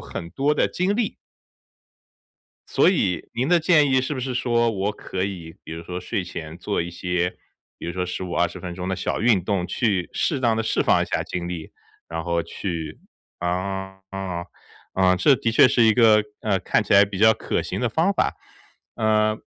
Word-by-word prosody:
很 85 - -7
多 145 +8 +1
的 - - +2
精 185 +3 0
力。 230 -2 -1 1.5
所 - - +4
以 100 - 0
您 125 +4 0
的 175 0 +4
建 155 -4 +4
议 130 0 +4
是 130 +3 -3
不 130 - -4
是 130 +1 -3
说 120 -1 +2
我 100 -1 -1
可 95 -2 -5
以 90 -4 -5
比 - - -8
如 80 +1 -6
说 90 +1 -5
睡 90 +1 -3
前 80 -2 -7
做 95 +3 -2
一 85 +1 -3
些， 90 0 -2 0.4
比 - - -7
如 85 - -3
说 90 0 -2
15、 90 0 -5
20 85 0 0
分 90 -1 -6
钟 90 +1 -5
的 95 - -1
小 - - -2
运 110 -5 +3
动， 95 -3 0
去 95 -6 0
适 145 -5 0
当 115 -3 +2
地 115 - 0
释 110 - +1
放 - - +3
一 - - 0
下 - - -1
精 90 -1 -4
力， 85 -3 -6 0.4
然 80 0 -4
后 85 -1 0
去 85 -6 -5 0.4
啊， 95 +2 -3
啊， 95 -3 -4 0.5
啊， 95 -1 +3
这 135 +10 +5
的 115 0 -1
确 120 - +7
是 120 - +3
一 110 - +6
个， 110 -2 +5 0.2
呃， 100 -3 +1
看 95 +4 +1
起 105 - +1
来 100 +1 +8
比 100 -1 -6
较 110 +2 +6
可 - - -2
行 - - -4
的 125 - +1
方 160 - +2
法。 195 - 0 0.6
呃， 110 -1 +2
100 Hz, 210 characters per minute, -23 LUFS, 90-115 Hz, 1.5 s, 来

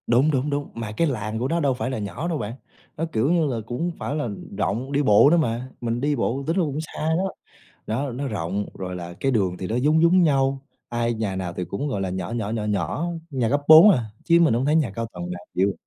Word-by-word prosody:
Đúng, 130 +6 +4
đúng, 135 +1 0
đúng, 145 0 -2
mà 115 -2 -5
cái 165 +10 +1
làng 110 -5 -3
của 125 - 0
nó 170 +4 0
đâu 140 -4 +2
phải 125 0 -3
là 130 - -3
nhỏ 105 +11 -4
đâu 170 -3 -1
bạn, 110 -2 -4 0.4
nó, 165 - -1
kiểu 120 +8 +1
như 170 -2 +3
là, 125 -4 -2
cũng 120 +1 -4
hông 175 +1 0
phải 145 - -3
là, 150 - -1
ừm, 100 -4 -7
rộng, 115 +8 -2
đi 145 0 +2
bộ 105 +3 +6
nữa 170 - +4
mà. 125 -5 -1
Mình 120 0 -2
đi 145 +1 +1
bộ 135 +2 -1
tính 165 - +1
ra - - +4
cũng 145 -1 -2
xa 160 - -9 0.2
đó, 190 +1 -1 0.6
đó, 130 +6 -2
nó 135 +4 -3
rộng, 100 -1 -2
rồi 90 -1 -5
là 85 -1 -7
cái 135 - +1
đường 95 -6 +1
thì 95 - -4
nó 110 - -2
giống 150 +5 +3
giống 180 +2 +5
nhau. 135 -3 +2 0.3
Ai 120 0 -1
nhà 105 -4 -2
nào 90 -2 -3
thì 90 - -4
cũng, 100 +11 -4
gọi 105 -8 -2
là, 95 -1 -2
nhỏ 95 +3 -4
nhỏ, 115 -3 -2
nhỏ 110 -1 -2
nhỏ, 105 - -1 0.2
nhà 130 -5 0
cấp 145 +4 +1
4 160 +6 +10
à, 125 - +2 0.2
chứ 170 0 +5
mình 160 -8 +4
hông 120 +3 0
thấy 150 - +3
nhà 150 -9 +2
cao 115 +3 -4
tầng 90 0 -6
nào 90 0 -6
chịu. 95 +2 +2
125 Hz, 270 wpm, -24 LUFS, 105-145 Hz, 0.6 s, 4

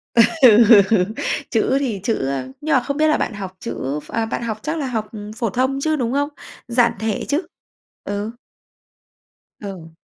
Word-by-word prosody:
Ừ. 230 - +8 1.3
Chữ 245 +3 +2
thì 230 -8 -2
chữ, 230 - +1
ơ 135 -2 -2
nhưng 310 0 +1
mà 260 - +5
không 280 +2 -3
biết 310 0 +3
là 305 - +3
bạn 230 - -2
học 190 -2 -7
chữ 150 - -4
ph - - -15
à, 225 0 0
bạn 225 - -3
học 220 -2 -3
chắc 315 +2 -2
là 285 - -2
học 220 -3 -2 0.3
phổ 230 -4 0
thông 260 +5 0
chứ, 315 +1 +1
đúng 245 -3 -1
không? 285 +1 +1 0.4
Giản 240 0 +3
thể 220 -1 -2
chứ? 295 +5 +1 0.6
Ừ. 205 +2 -3 1.3
Ừ. 190 -5 -8
235 Hz, 180 wpm, -20 LUFS, 205-275 Hz, 1.3 s, Ừ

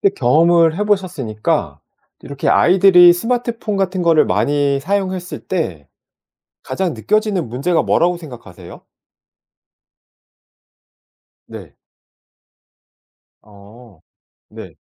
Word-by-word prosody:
근데 200 - +2
경험을 165 +5 +2
해 210 - -2
보셨으니까 175 - -2 0.4
이렇게 140 -1 -5
아이들이 180 -1 +5
스마트폰 230 +1 -3
같은 190 -1 -2
거를 165 -2 +3
많이 140 +8 0
사용했을 185 +1 -4
때 90 - -4 0.8
가장 185 -4 -3
느껴지는 205 - -1
문제가 160 +8 -1
뭐라고 175 +1 +1
생각하세요? 140 -9 -13 2.7
네. - - -12 1.7
어 105 -1 -18 0.5
네. - - -12
170 Hz, 215 characters per minute, -17 LUFS, 130-190 Hz, 2.7 s, 아이들이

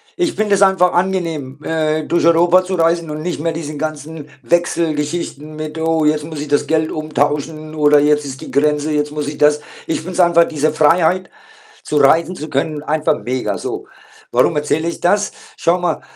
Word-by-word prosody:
ich 355 -3 -1
finde 210 -1 +1
es 200 - +2
einfach 190 -2 +4
angenehm, 165 -7 -2
äh, 155 -1 -1
durch 170 - 0
Europa 175 +2 +5
zu 185 +1 -3
reisen 165 -1 +1
und 150 0 -5
nicht 180 -2 -3
mehr 165 +2 -1
diesen 155 -2 -6
ganzen 155 0 -6
Wechselgeschichten 155 0 -1
mit 155 +1 -6
„Oh, 160 -1 +1
jetzt 150 0 +2
muss 155 -1 -7
ich 150 - -5
das 145 - +1
Geld 160 -1 +1
umtauschen“, 155 0 -2
oder 150 -1 +4
„Jetzt 150 0 +2
ist 135 -1 -7
die - - -9
Grenze, 150 +1 +1
jetzt 150 0 -1
muss 150 -1 -4
ich 145 0 -6
das“, 150 0 +4 0.3
ich - - 0
finde 170 +4 -7
es 175 - -5
einfach 170 -1 +5
diese 155 0 0
Freiheit, 165 +4 +2 0.5
zu 150 - -2
reisen 165 +6 +3
zu 155 - -7
können, 145 +2 -2
einfach 155 0 0
mega 125 +1 -2
so. - - -5 0.4
Warum - - +2
erzähle 150 +2 0
ich 170 - -4
das? 205 +4 +2 0.3
Schau 175 +2 +1
mal, 175 -3 -1
155 Hz, 195 wpm, -17 LUFS, 150-170 Hz, 0.5 s, Europa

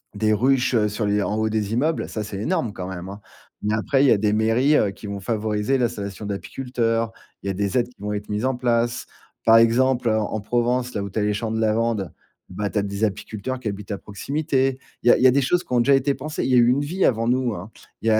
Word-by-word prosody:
des 110 +1 +2
ruches 130 +3 +2
sur 105 +1 -2
les 105 0 +1
en 105 - -1
haut 110 0 0
des 105 -1 -1
immeubles, 155 +7 0
ça, 110 - -4
c'est 100 -2 -6
énorme 110 0 -1
quand 90 0 -6
même, 95 0 -6
hein, 100 +1 -9 0.4
mais 105 +1 0
après, 135 +5 +2
il - - +5
y - - +5
a 110 - +5
des 105 0 +1
mairies 115 +7 +3
heu, 105 - +3
qui 100 - -10
vont 100 -1 -4
favoriser 105 +4 0
l'installation 105 -4 -3
d'apiculteurs. 115 +2 -2 0.3
Il - - -5
y - - 0
a - - -2
des 100 +4 -1
aides 120 - +1
qui 125 - -22
vont 105 - -3
être 105 0 -4
mises 105 +4 -1
en 130 - +1
place. 120 -1 0 0.4
Par 115 0 +7
exemple, 120 +1 +3
en 110 0 0
Provence, 120 +3 0
là 100 - -1
où 100 - -5
tu 110 - -2
as - - +1
les 105 - +1
champs 110 +1 -3
de 110 - -1
lavande, 110 -2 0 0.4
ben 105 +3 -3
tu 110 - -3
as - - +1
des 100 +1 -4
apiculteurs 110 +5 -4
qui 120 - -6
habitent 100 +1 -7
à 100 - -2
proximité. 135 +4 -1 0.2
Il - - -2
y - - +9
a - - +3
il - - -1
y - - +9
a - - +6
des 140 - +3
choses 175 +6 +1
qui - - -20
ont 120 - +4
déjà 140 +4 +4
été 135 +1 +2
pensées. 150 +3 -4
Il - - -1
y - - +5
eu 120 - +6
a - - +5
une 135 +3 +2
vie 175 +7 0
avant 115 -1 +1
nous, 125 -1 +1
hein. 95 +2 -7 0.3
Il 115 - -3
y - - +5
a 110 - +4
115 Hz, 275 wpm, -23 LUFS, 105-125 Hz, 0.4 s, y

